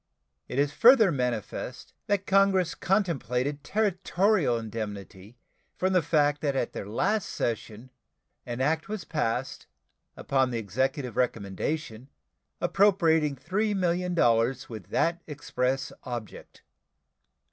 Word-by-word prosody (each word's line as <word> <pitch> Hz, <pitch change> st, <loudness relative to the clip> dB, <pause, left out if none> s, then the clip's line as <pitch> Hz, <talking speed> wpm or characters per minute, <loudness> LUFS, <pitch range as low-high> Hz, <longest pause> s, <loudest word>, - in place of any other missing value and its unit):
It -, -, -5 dB
is 145 Hz, 0 st, +2 dB
further 230 Hz, -, +6 dB
manifest 125 Hz, -6 st, -4 dB
that 200 Hz, -1 st, 0 dB
Congress 190 Hz, -3 st, +3 dB
contemplated 145 Hz, -, -1 dB
territorial 195 Hz, -, +1 dB
indemnity 105 Hz, -1 st, -7 dB, 0.4 s
from 190 Hz, +1 st, +1 dB
the 180 Hz, -, +4 dB
fact 145 Hz, -2 st, +2 dB
that 140 Hz, -3 st, 0 dB
at 130 Hz, -, -1 dB
their 100 Hz, -, -6 dB
last 200 Hz, -, 0 dB
session 115 Hz, +1 st, -4 dB, 0.5 s
an 120 Hz, +1 st, -5 dB
act 160 Hz, +6 st, 0 dB
was 215 Hz, -4 st, -4 dB
passed, 135 Hz, -5 st, -2 dB, 0.5 s
upon 135 Hz, -1 st, +1 dB
the 120 Hz, -, -3 dB
Executive 130 Hz, -, -2 dB
recommendation, 115 Hz, +2 st, -2 dB, 0.5 s
appropriating 165 Hz, -7 st, +3 dB
$3,000,000 175 Hz, -, +1 dB
with 110 Hz, -7 st, -8 dB
that 170 Hz, +1 st, +1 dB
express 135 Hz, -2 st, -2 dB
object. 120 Hz, -5 st, -8 dB
145 Hz, 105 wpm, -27 LUFS, 120-180 Hz, 0.5 s, further